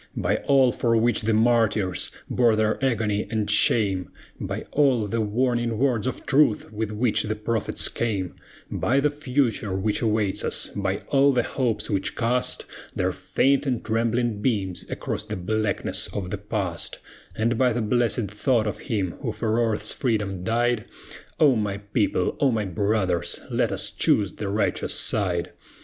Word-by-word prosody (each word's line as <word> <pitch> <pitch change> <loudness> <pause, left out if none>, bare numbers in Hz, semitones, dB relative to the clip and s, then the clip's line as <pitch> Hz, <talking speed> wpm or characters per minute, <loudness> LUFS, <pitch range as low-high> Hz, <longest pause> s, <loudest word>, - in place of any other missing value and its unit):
By - - +1
all 135 -3 +4
for 115 -1 +1
which 120 +2 +2
the 110 0 +1
martyrs 110 -4 +2 0.2
bore 120 -3 +3
their 110 +4 0
agony 110 -6 0
and 110 -2 -1
shame; 100 -3 +2 0.3
By - - -4
all 135 -7 +3
the 115 +3 -1
warning 120 +1 0
words 120 -4 +1
of 130 - -4
truth 135 -6 +2
with 110 0 -2
which 110 +1 +1
the 110 0 -2
prophets 110 +1 0
came; 100 -6 -2 0.4
By 130 +4 +1
the 145 +1 +2
Future 125 -8 -1
which 105 +2 -1
awaits 105 -4 0
us; - - -2
by 100 -1 -1
all 140 0 +4
the 120 -2 +2
hopes 120 -4 -1
which 100 -3 -2
cast 120 +2 0 0.3
Their - - +1
faint 140 +1 +1
and 125 -3 -1
trembling 115 -1 0
beams 100 -7 -1
across - - -3
the 105 0 -5
blackness 110 +3 -1
of 95 -3 -5
the 105 - -2
Past; 100 -4 -3 0.4
And 115 +2 +1
by 125 +1 +3
the 120 0 -1
blessed 115 -2 +1
thought 110 +1 +1
of 105 - -3
Him 100 -6 -2
who - - -2
for 110 +1 0
Earth's 110 -2 0
freedom 105 - -1
died, 120 +1 +1 0.5
O 145 -5 +6
my 105 -3 -1
people! 100 0 0
O 140 - +4
my 110 -4 0
brothers! 95 -2 0
let - - +1
us - - -2
choose 100 -2 +2
the 105 - -4
righteous 100 +1 0
side. 90 -5 0
110 Hz, 165 wpm, -24 LUFS, 105-120 Hz, 0.5 s, O